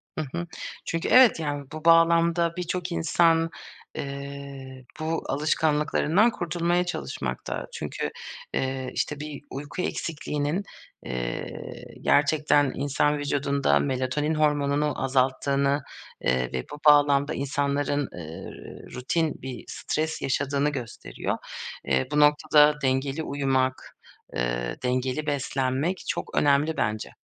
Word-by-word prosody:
Hı 155 - -2
hı. 170 0 -3 0.4
Çünkü 165 0 -2
evet, 255 -8 +7
yani, 145 -2 -3
bu 155 +1 -8
bağlamda 170 0 +5
birçok 180 0 -3
insan, 165 0 +3 0.5
eee, 140 -1 -7 0.2
bu 160 +1 -1
alışkanlıklarından 155 - +2
kurtulmaya 175 -1 0
çalışmakta. 175 - -4
Çünkü, - - -3 0.4
eee, 130 -1 -1
işte, 150 - -2
bir 150 -1 -6
uyku 145 +6 -5
eksikliğinin, 150 +1 -2 0.4
eee, - - -5 0.2
gerçekten 145 -1 +3
insan 145 +1 +1
vücudunda 140 - +1
melatonin 130 - 0
hormonunu 145 -1 +1
azalttığını, 140 +2 +2 0.4
eee, 65 -1 +1
ve 65 -1 -2
bu 145 - -7
bağlamda 145 0 +5
insanların, 140 0 0
eee, 80 -1 -8 0.4
rutin 155 +5 -1
bir 130 -2 -6
stres 155 +1 -2
yaşadığını 140 +2 +1
gösteriyor. 130 -6 -4 0.5
Eee, 65 -1 +1
bu 150 - +2
noktada 150 0 +5
dengeli 135 +3 0
uyumak, 135 -2 -1 0.4
eee, - - -1
dengeli 130 +4 -1
beslenmek 140 +4 -1
çok - - -3
önemli 145 +2 +3
bence. 110 0 -1
145 Hz, 110 wpm, -26 LUFS, 135-155 Hz, 0.5 s, evet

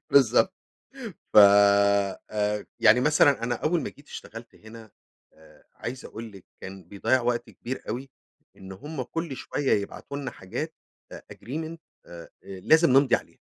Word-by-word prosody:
بالضبط، 140 - +4 0.8
ف - - +3
آآ، 100 +1 +4
يعني 115 +3 +6
مثلًا 145 -4 +3
أنا 120 +1 -1
أول 160 +4 0
ما - - -4
جيت 145 - -20
اشتغلت 115 +2 -10
هنا 110 0 -14 0.4
آآ، 80 0 -21
عايز 130 +2 -7
أقول 115 0 -9
لِك 95 -2 -15 0.2
كان 95 -1 -9
بيضيّع 100 +8 0
وقت 120 0 -2
كبير 130 +2 -7
أوي، 130 +4 -5 0.5
إن 95 0 -11
هُم 145 +7 -7
كُلّ 165 0 -5
شوية 140 +1 -2
يبعتوا 140 +7 -8
لنا 140 -2 -5
حاجات 95 0 -6 0.4
a - - -7 0.2
agreement 160 +8 -6 0.3
آآ، 85 -1 -11
لازم 155 - +2
نمضي 130 0 +5
عليها. - - -10
115 Hz, 145 wpm, -26 LUFS, 100-140 Hz, 0.8 s, يعني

